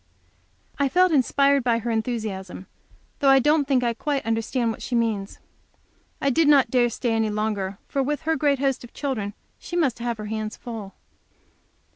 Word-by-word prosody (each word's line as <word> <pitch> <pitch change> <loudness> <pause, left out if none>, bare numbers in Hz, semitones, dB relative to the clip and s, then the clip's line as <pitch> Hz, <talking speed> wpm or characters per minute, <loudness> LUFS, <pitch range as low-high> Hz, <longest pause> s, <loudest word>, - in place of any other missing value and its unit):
I 280 -1 +2
felt 365 +4 +4
inspired 280 -1 +3
by 235 -2 +2
her 235 +1 -3
enthusiasm, 215 -5 -3 0.5
though 280 -3 +4
I 270 - +7
don't 295 +2 +3
think 260 -3 +2
I 235 -1 +1
quite 275 +1 -2
understand 225 +1 0
what - - -8
she 245 - -3
means. 220 -4 -1 0.8
I 275 - +1
did 320 +3 +3
not 275 -5 +5
dare 250 -2 +4
to - - -3
stay 235 +1 -2
any 225 -1 +1
longer, 210 -2 -2
for, 275 - -1
with 295 +3 -2
her 320 +1 +1
great 285 -1 +2
host 270 -1 -1
of 240 - -12
children, 220 -8 -3 0.2
she 345 - -7
must 280 -9 +1
have 235 -1 -2
her 215 - -6
hands 215 0 -4
full. 220 -5 -8
240 Hz, 185 wpm, -24 LUFS, 220-280 Hz, 0.8 s, I